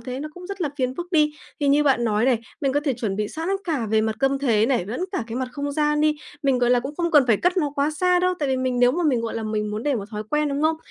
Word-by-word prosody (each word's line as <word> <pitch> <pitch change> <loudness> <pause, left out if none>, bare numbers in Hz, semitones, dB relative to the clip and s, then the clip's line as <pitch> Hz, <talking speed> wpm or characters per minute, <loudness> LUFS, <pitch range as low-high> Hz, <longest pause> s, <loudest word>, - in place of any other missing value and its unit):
thế 250 +3 -6
nó 305 - -5
cũng 360 0 -10
rất 395 -1 -7
là 310 - 0
phiền 255 -2 -1
phức 350 +3 -7
đi. 300 -2 +3 0.3
Thì 285 - +2
như 290 +2 +4
bạn 265 -4 +2
nói 220 0 +1
này, 255 -3 +3 0.2
mình 270 -2 +1
có 290 - +1
thể 275 - +1
chuẩn 225 -5 -3
bị 210 0 -1
sẵn 325 +3 -5 0.2
cả 290 -10 -1
về 220 0 +3
mặt 220 0 -1
câm 270 0 +1
thế 230 -6 +2
này, 240 -8 0
lẫn 245 - -3
cả 255 - -2
cái 230 +1 -5
mặt 260 -1 -2
không 285 +2 -3
gian 300 0 +1
đi, 305 0 +3 0.3
mình, 270 -3 +2
gọi 245 0 +2
là, 245 - +4
cũng 275 +4 -6
không 340 -1 0
cần 290 -4 +6
phải 225 -4 +4
cất 360 - +1
nó 295 -5 +1
quá 285 +2 +1
xa 360 +3 +2
đâu, 365 0 +1
tại 290 -3 -1
vì 260 - +1
mình 255 -1 -1
nếu 245 0 +5
mà 350 - -1
mình, 260 -7 +2
gọi 230 - -4
là, 225 - -3
mình 215 -1 -2
muốn 215 +2 -4
để 290 -2 +1
một 205 - -3
thói 210 0 -4
quen, 300 0 +1
đúng 280 +2 -2
không? 315 +1 +2
275 Hz, 330 wpm, -23 LUFS, 235-300 Hz, 0.3 s, cần